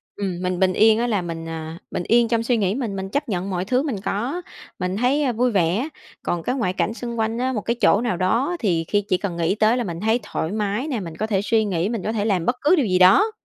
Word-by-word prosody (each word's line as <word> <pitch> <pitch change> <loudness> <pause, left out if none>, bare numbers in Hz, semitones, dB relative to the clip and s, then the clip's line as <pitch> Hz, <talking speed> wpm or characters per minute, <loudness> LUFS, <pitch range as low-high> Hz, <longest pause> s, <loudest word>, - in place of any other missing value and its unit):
ừm, 190 -3 -3
mình 180 0 -1
bình 185 -1 +3
yên 220 +2 +5
á 240 - +1
là 210 -6 0
mình, 165 -1 -5
ờ, 160 0 -6
bình 175 - -2
yên 235 0 +4
trong 230 0 +1
suy 240 0 +1
nghĩ 200 -2 +1
mình, 235 -7 -3
mình 190 0 -4
chấp 285 +3 -2
nhận 190 -1 -2
mọi 180 -1 -2
thứ 255 +6 +1
mình 240 -11 -3
có, 255 - -2 0.4
mình 180 +1 -2
thấy 255 +2 +2
vui 245 +2 +1
vẻ, 195 - +1 0.3
còn 175 -1 -2
cái 250 - -1
ngoại 200 -9 0
cảnh 215 - -1
xung 235 -1 -5
quanh 225 +1 0
á, 260 +1 0
một 215 - -2
cái 235 - -1
chỗ 205 - +4
nào 235 -7 -1
đó 230 - +1
thì 170 -7 0
khi 205 0 +1
chỉ 185 - +3
cần 180 -3 -4
nghĩ 170 +3 +1
tới 220 +3 +3
là 245 - 0
mình 170 -3 -5
thấy 220 +3 +2
thoải 165 -5 -3
mái 210 +6 -1
nè, 250 -7 -2
mình 165 -4 -7
có 215 - -2
thể 200 -3 +1
suy 220 +1 +2
nghĩ, 185 -1 -1
mình 225 -5 -3
có 220 - -1
thể 210 -2 -1
làm 185 -6 +1
bất 245 - +1
cứ 310 +5 +5
điều 290 -8 +2
gì 185 -2 +1
đó. 195 - +6
210 Hz, 280 wpm, -22 LUFS, 185-235 Hz, 0.4 s, đó